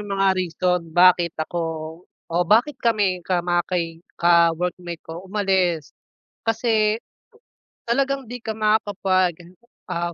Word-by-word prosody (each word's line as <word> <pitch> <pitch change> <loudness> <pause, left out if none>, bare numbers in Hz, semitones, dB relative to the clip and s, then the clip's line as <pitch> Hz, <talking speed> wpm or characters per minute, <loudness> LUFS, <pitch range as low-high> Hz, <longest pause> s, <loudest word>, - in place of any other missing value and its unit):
'yong 205 -1 -6
mga 195 -1 +2
reason 180 -1 0
bakit 175 -1 +5
ako 165 0 -4 0.2
o 165 - -7
bakit 235 - +3
kami 205 -8 0
ka 180 -2 +1
maki 175 -1 -2 0.2
ka-workmate 170 0 +2
ko 170 +3 -9
umalis. 190 -6 0 0.5
Kasi, 220 -1 +2 0.9
talagang 270 0 0
di 245 - -5
ka 225 -2 -5
makakapag, 185 -5 0 0.3
ah, 170 0 -2
180 Hz, 115 wpm, -22 LUFS, 170-210 Hz, 0.9 s, bakit